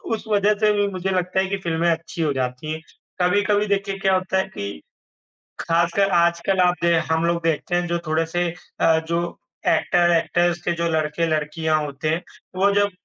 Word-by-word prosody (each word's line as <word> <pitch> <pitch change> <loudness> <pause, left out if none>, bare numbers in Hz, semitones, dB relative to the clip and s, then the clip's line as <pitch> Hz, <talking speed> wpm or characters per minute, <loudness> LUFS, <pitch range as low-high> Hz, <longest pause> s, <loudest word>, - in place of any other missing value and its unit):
उस - - -9
वजह 210 -1 +3
से 215 -1 +4
भी 205 -1 +1
मुझे 190 -1 -3
लगता 185 0 0
है 190 - +2
कि 200 - -1
फ़िल्में 170 0 +1
अच्छी 165 +1 -4
हो 155 -2 +1
जाती 130 +3 -3
हैं। 160 - -6 0.4
कभी-कभी 205 +3 +2
देखिए, 195 -1 -1
क्या 195 0 +2
होता 185 +1 -1
है 190 - +3
कि 100 - -6 0.8
खासकर 170 +4 +1
आजकल 170 +2 +1
आप 180 -1 +4
दे 170 0 +3 0.2
हम 160 +1 +1
लोग 170 0 0
देखते 165 +2 0
हैं, 175 0 +1
जो 170 0 -1
थोड़े-से 165 +3 0 0.3
अ, 160 -1 +4
जो 170 +1 -2 0.3
एक्टर-एक्टर्स 175 0 +2
के 175 - 0
जो 170 - +1
लड़के-लड़कियाँ 155 0 0
होते 145 +1 -4
हैं, 165 +3 -1 0.3
वो 195 +2 +3
जब 205 0 +3
170 Hz, 180 wpm, -22 LUFS, 160-190 Hz, 0.8 s, से